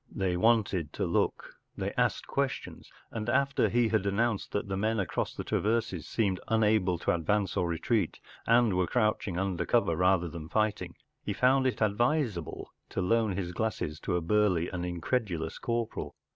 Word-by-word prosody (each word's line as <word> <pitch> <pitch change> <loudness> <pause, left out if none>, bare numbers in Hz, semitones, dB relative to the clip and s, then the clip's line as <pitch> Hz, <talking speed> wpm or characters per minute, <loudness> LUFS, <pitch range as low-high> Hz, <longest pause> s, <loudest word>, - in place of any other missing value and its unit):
They 95 -2 -1
wanted 100 -6 +2
to - - -1
look, - - -1 0.2
they - - -2
asked - - 0
questions, - - -3 0.2
and 110 0 -3
after 140 +2 +2
he 120 -1 +2
had 105 -2 +1
announced 110 +1 0
that 100 - -2
the 95 - -2
men 110 +3 0
across 95 - -2
the - - -4
traverses 115 +2 -1
seemed 100 -5 0
unable 105 -5 +2
to - - 0
advance 95 +3 0
or 90 -3 +1
retreat, 85 +3 0 0.3
and 115 -2 +4
were 90 -1 +1
crouching 105 -6 0
under 95 -2 -1
cover 115 -6 +2
rather 90 0 +3
than 80 -1 -8
fighting, 105 -5 -1 0.3
he - - -2
found 130 +1 +3
it 125 - 0
advisable 110 - 0 0.2
to - - -4
loan 110 +2 +2
his 90 -2 -3
glasses 90 -6 -2
to 90 - -2
a 90 - 0
burly 90 -2 +2
and 90 -1 -3
incredulous 85 -2 -2
corporal. 115 -1 -3
100 Hz, 170 wpm, -29 LUFS, 90-115 Hz, 0.3 s, and